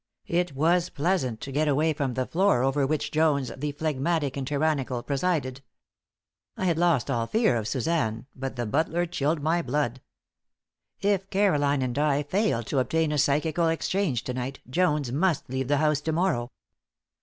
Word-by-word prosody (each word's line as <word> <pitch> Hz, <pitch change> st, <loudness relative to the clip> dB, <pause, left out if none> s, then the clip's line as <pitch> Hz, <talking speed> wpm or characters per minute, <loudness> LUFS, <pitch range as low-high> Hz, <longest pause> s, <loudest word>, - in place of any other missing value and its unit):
It 175 Hz, -4 st, -1 dB
was 170 Hz, +5 st, +2 dB
pleasant 140 Hz, -8 st, -1 dB
to 135 Hz, -, -6 dB
get 150 Hz, +3 st, +1 dB
away 150 Hz, +3 st, +2 dB
from 135 Hz, -4 st, -2 dB
the 130 Hz, -, 0 dB
floor 165 Hz, -8 st, +2 dB
over 135 Hz, +1 st, +1 dB
which 155 Hz, 0 st, -1 dB
Jones, 150 Hz, -4 st, +2 dB
the 145 Hz, +2 st, -3 dB
phlegmatic 150 Hz, 0 st, -1 dB
and 135 Hz, -2 st, -4 dB
tyrannical, 140 Hz, -4 st, 0 dB
presided. 140 Hz, -3 st, -1 dB, 1.0 s
I 190 Hz, -, -2 dB
had 170 Hz, -3 st, +1 dB
lost 170 Hz, -6 st, +2 dB
all 115 Hz, -2 st, 0 dB
fear 220 Hz, -, +2 dB
of 110 Hz, -2 st, -2 dB
Suzanne, 120 Hz, -3 st, -1 dB
but 135 Hz, 0 st, -5 dB
the 120 Hz, -1 st, -2 dB
butler 160 Hz, +8 st, 0 dB
chilled 150 Hz, -2 st, -1 dB
my 165 Hz, +3 st, +2 dB
blood. 130 Hz, -3 st, -1 dB, 1.0 s
If 200 Hz, -1 st, +1 dB
Caroline 145 Hz, -9 st, +2 dB
and 125 Hz, +2 st, -2 dB
I 150 Hz, -1 st, +2 dB
failed 165 Hz, -, 0 dB
to 140 Hz, -, +1 dB
obtain 160 Hz, +4 st, +1 dB
a 150 Hz, -, 0 dB
psychical 155 Hz, +4 st, +2 dB
exchange 165 Hz, -, 0 dB
to 125 Hz, -, -4 dB
night 130 Hz, +2 st, -4 dB
Jones 150 Hz, -3 st, +1 dB
must 160 Hz, +2 st, +1 dB
leave 130 Hz, -1 st, -2 dB
the 145 Hz, +1 st, +2 dB
house 150 Hz, -1 st, +2 dB
to 160 Hz, -, -2 dB
morrow. 155 Hz, -8 st, 0 dB
145 Hz, 170 wpm, -26 LUFS, 130-165 Hz, 1.0 s, was